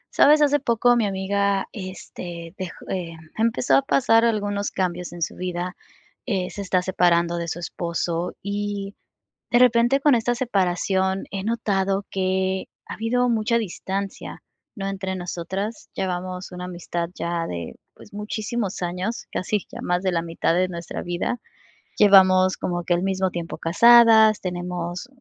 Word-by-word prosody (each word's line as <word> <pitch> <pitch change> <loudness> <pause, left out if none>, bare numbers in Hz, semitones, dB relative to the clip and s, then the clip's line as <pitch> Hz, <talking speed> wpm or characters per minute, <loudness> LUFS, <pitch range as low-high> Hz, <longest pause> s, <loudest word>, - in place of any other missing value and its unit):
¿Sabes? 300 +1 +6
Hace 290 0 +3
poco 245 -2 +3
mi 230 -3 +2
amiga, 195 0 0
este, 175 -3 -8
dej 185 - -3 0.2
em, 170 -3 -4 0.2
empezó 230 +2 +2
a - - +4
pasar 230 -4 +3
algunos 205 -2 0
cambios 180 -1 -2
en 175 -1 -4
su - - -3
vida. 180 0 -4 0.5
Eh, 190 -6 -1
se 205 - -6
está 185 -2 +1
separando 175 -2 +2
de 170 0 -3
su 165 - -3
esposo, 170 0 -3
y 200 0 -3 0.6
de 240 - +5
repente 245 +2 +4
con 280 -1 +4
esta 240 +1 +1
separación 190 -4 0
he 195 -1 -4
notado 200 -3 0
que 190 0 0 0.2
ha - - -6
habido 245 +3 +1
mucha 230 0 +2
distancia, 195 -1 -5 0.3
¿no?, 195 -3 -4
entre 190 -1 -3
nosotras. 185 +4 -5
Llevamos 185 0 -4
una 180 0 -6
amistad 175 -1 -4
ya 170 -2 -2
de 85 - -6 0.4
muchísimos 210 0 -3
años, 180 +6 -3
casi 205 +3 -1
ya - - -8
más 180 0 0
de 190 -1 0
la 165 -1 0
mitad 165 0 0
de 185 +1 +2
nuestra 170 -2 -6
vida. 175 +7 -2 0.6
Llevamos 185 -2 +6
como 175 -1 -2
que 175 +1 +1
al 175 - -1
mismo 190 -1 0
tiempo 170 -1 -6
casadas, 220 +3 +6
tenemos 180 +1 -4
190 Hz, 150 wpm, -23 LUFS, 175-215 Hz, 0.6 s, Sabes